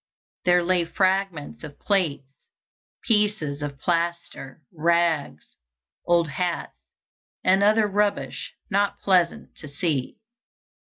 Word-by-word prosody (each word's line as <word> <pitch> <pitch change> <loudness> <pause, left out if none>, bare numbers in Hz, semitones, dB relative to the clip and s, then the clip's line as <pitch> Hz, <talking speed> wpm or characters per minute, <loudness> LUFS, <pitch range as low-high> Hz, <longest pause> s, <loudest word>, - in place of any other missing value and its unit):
There 180 -1 +4
lay 180 0 +2
fragments 190 -3 -1
of 145 -2 -9
plates, 175 -9 0 0.8
pieces 210 - +1
of 145 -1 -5
plaster, 170 -5 -3
rags, 165 - 0 0.5
old 170 -1 +3
hats, 175 +3 -3 0.7
and 190 +1 +4
other 215 +2 +4
rubbish 195 -11 -1 0.2
not 200 0 0
pleasant 180 -3 +1
to 155 - -10
see. 145 -2 -2
170 Hz, 100 wpm, -24 LUFS, 150-195 Hz, 0.8 s, There